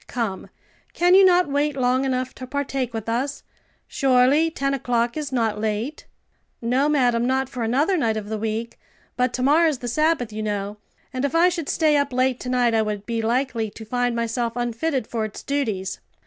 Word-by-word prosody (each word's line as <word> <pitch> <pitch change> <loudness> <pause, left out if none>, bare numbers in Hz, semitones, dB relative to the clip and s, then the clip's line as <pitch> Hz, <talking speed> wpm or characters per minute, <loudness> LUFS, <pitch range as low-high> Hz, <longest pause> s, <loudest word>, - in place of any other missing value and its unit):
Come, 225 -6 -3 0.4
can 355 +1 +3
you 390 +1 +8
not 360 -2 +5
wait 285 0 0
long 255 +1 +2
enough 255 -1 -1
to 255 - -9
partake 270 -2 -2
with 225 -2 -5
us? 260 +5 -2 0.4
Surely, 270 +4 +3
ten 275 -3 -1
o'clock 240 -3 0
is 300 -3 -4
not 225 -4 0
late." 220 +7 -3 0.5
"No, 255 +5 +1
madam; 245 -5 +2
not 265 0 0
for 250 -3 -6
another 275 - +2
night 225 -7 +1
of 210 -1 -5
the 220 0 -3
week, 225 +2 -3 0.4
but 250 -1 +1
to 250 - -2
morrow's 305 +2 +4
the 245 - -6
Sabbath, 280 -3 +1
you 215 - -4
know, 205 -1 -3 0.4
and 255 +1 -2
if 280 +2 -1
I 345 +2 +5
should 340 -4 -4
stay 305 -2 +3
up 285 -1 0
late 255 0 +1
to 250 - -5
night 245 -2 +2
I 225 - +3
would 210 -1 -3
be 230 0 -2
likely 230 -1 0
to 220 +2 -11
find 245 +1 0
myself 235 0 -1
unfitted 245 +3 -1
for 225 -1 -3
its 215 -1 -6
duties. 220 -10 -2
250 Hz, 195 wpm, -23 LUFS, 230-280 Hz, 0.5 s, you